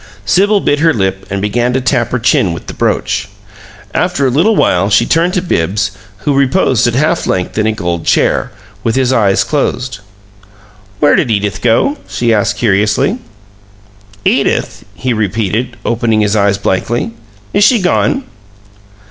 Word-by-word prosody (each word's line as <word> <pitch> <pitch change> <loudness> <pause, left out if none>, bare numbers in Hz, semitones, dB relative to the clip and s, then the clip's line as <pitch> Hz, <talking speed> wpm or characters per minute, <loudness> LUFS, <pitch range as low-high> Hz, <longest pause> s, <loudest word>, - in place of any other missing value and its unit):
Sibyl 200 - +3
bit 145 - +1
her 160 0 +3
lip 95 -2 -2
and 100 0 -3
began 120 +4 0
to 130 - +1
tap 125 -2 0
her 125 - -1
chin 105 -6 +2
with 85 - -8
the - - -7
brooch. - - -1 0.6
After 180 -6 0
a 130 - +2
little 180 - +2
while 100 - +2
she 105 +3 +3
turned 170 - +1
to 180 - 0
Bibbs, 95 - -1 0.3
who 145 - +2
reposed 135 - +2
at 120 - -1
half 155 +5 +1
length 90 -1 -2
in 110 - +1
a - - +2
gold 85 -6 -3
chair, - - +1 0.3
with 115 - 0
his 130 -1 +1
eyes 100 -5 +2
closed. 125 -6 -2 1.0
"Where 145 - +4
did 130 - +1
Edith 100 -5 -1
go?" 125 - +1
she 120 -1 0
asked, 105 -1 0
curiously. 105 - +1 1.1
"Edith?" - - 0
he 130 -1 -2
repeated, 110 +3 -2
opening 115 -2 +1
his 105 0 +1
eyes 100 -1 +2
blankly. 115 +5 -1 0.4
"Is 205 - +3
she 230 +2 +4
gone?" 200 +8 +1
120 Hz, 160 wpm, -13 LUFS, 105-145 Hz, 1.1 s, Where